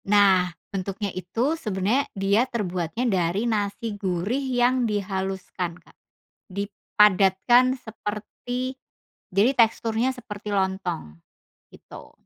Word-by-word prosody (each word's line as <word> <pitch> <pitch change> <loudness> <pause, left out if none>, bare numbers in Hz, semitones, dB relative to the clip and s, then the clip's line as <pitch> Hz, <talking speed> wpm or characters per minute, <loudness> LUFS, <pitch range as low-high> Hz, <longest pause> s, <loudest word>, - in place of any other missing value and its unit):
Nah, 195 -3 +5 0.2
bentuknya 195 +1 -3
itu 225 - -1
sebenarnya 220 - 0
dia 200 +6 +2
terbuatnya 185 -1 -2
dari 190 -1 +1
nasi 215 0 -1
gurih 200 +5 -1
yang 250 -2 +2
dihaluskan 190 -3 -3
Kak. - - -23 0.5
Dipadatkan 205 +4 +3
seperti 235 +3 -5 0.6
jadi 205 +8 +3
teksturnya 230 0 +2
seperti 210 -3 -8
lontong. 190 - -2 0.5
Gitu. - - -13
205 Hz, 95 wpm, -25 LUFS, 190-235 Hz, 0.6 s, Nah